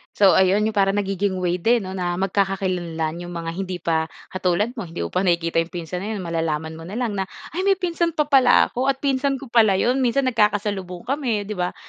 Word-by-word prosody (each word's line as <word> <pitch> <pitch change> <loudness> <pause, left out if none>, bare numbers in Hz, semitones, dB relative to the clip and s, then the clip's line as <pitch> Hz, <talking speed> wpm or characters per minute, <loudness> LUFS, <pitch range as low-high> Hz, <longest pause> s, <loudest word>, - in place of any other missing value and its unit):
So, 195 -2 +6
ayon 190 +2 +4
'yong 220 - +1
parang 195 -1 +2
nagiging 195 -1 -1
way 180 0 0
din 230 +3 +2
'no 185 - -6
na 180 -2 -2
magkakakilanlan 180 -4 -1
'yong 175 0 -7
mga 165 -1 -4
hindi 185 +1 -4
pa 160 -1 +1 0.2
katulad 185 +4 0
mo, 180 - -5
hindi 165 - -5
mo 85 - -5
pa 185 +1 0
nakikita 170 -1 +1
'yong 165 - 0
pinsan 175 +1 -4
na 215 +3 -4
'yon, 190 - -5
malalaman 160 -2 -2
mo 165 - -9
na 200 - -7
lang 225 -5 -2
na, 190 - -2 0.2
"Ay! 370 +5 -2
may 390 - +5
pinsan 340 -3 -1
pa 300 - +3
pala 270 -4 +4
ako 255 +2 -1
at 270 +1 0
pinsan 275 0 +1
ko 265 -3 -10
pala 220 -5 +5
'yon, 250 +7 +1
minsan 260 +2 +2
nagkakasalubong 205 -6 0
kami." 245 -5 -1
'di 205 - -8
ba? 180 0 -1
195 Hz, 225 wpm, -22 LUFS, 175-240 Hz, 0.2 s, So